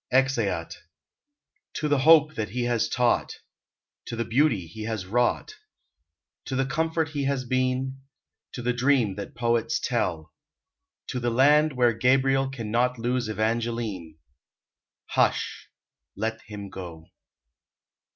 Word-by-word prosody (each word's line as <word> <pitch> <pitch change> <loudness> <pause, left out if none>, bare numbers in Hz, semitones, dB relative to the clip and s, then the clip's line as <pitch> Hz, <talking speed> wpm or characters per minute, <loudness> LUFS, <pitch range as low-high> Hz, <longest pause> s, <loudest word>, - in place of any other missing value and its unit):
EXEAT. 120 -10 +1 1.0
To 155 - -1
the 145 -2 +2
hope 155 +1 +6
that 110 -4 -3
he 120 +4 -2
has 120 -2 0
taught, 125 -1 +1 0.7
To - - -4
the 115 0 -2
beauty 115 - +2
he 105 +7 -8
has 110 -4 -3
wrought, 120 +5 0 0.9
To 130 - -4
the 135 +1 +1
comfort 160 +3 -1
he 145 -2 -2
has 135 -2 -1
been; 130 +1 -1 0.5
To 125 - -6
the 125 +1 +1
dream 125 -4 +2
that 100 - -7
poets 120 +5 0
tell, 90 -10 -2 0.8
To 125 - -2
the 120 0 0
land 145 +5 +4
where 120 -2 +3
Gabriel 135 +3 +2
Can 115 -5 -6
not 125 +2 +1
lose 120 0 -1
Evangeline; 110 -5 -2 0.9
Hush! - - 0 0.5
let 110 +2 -3
him 100 -2 -8
go. 85 -4 -8
120 Hz, 130 wpm, -26 LUFS, 110-135 Hz, 1.0 s, hope